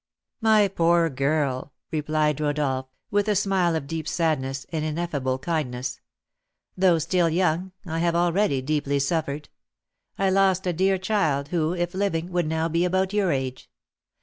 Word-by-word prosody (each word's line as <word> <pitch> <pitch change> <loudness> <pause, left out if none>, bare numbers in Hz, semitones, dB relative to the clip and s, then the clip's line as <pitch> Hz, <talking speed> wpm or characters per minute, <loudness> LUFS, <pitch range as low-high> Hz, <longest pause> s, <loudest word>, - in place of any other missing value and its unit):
"My 215 -2 +5
poor 170 -3 +2
girl," 135 -1 -1 0.2
replied 155 -1 0
Rodolph, 145 -3 -1 0.2
with 205 +1 +1
a 210 - +2
smile 185 -4 +2
of 160 - -2
deep 160 +1 -4
sadness 135 -6 -1
and 160 -2 -2
ineffable 150 -5 -2
kindness, 130 -4 -3 0.7
"though 185 -2 +4
still 170 +2 +1
young, 180 +2 0
I 165 -2 -3
have 170 0 +1
already 175 -5 +2
deeply 145 0 0
suffered. 145 0 -1 0.7
I 195 -1 +2
lost 190 -1 +3
a 180 - 0
dear 190 +3 +2
child, 160 -8 0
who, 165 0 0
if 175 0 -2
living, 185 -3 -1
would 175 -3 0
now 160 +1 0
be 165 +1 +1
about 185 +2 +1
your 200 -4 +2
age. 130 -2 -3
165 Hz, 150 wpm, -25 LUFS, 145-185 Hz, 0.7 s, My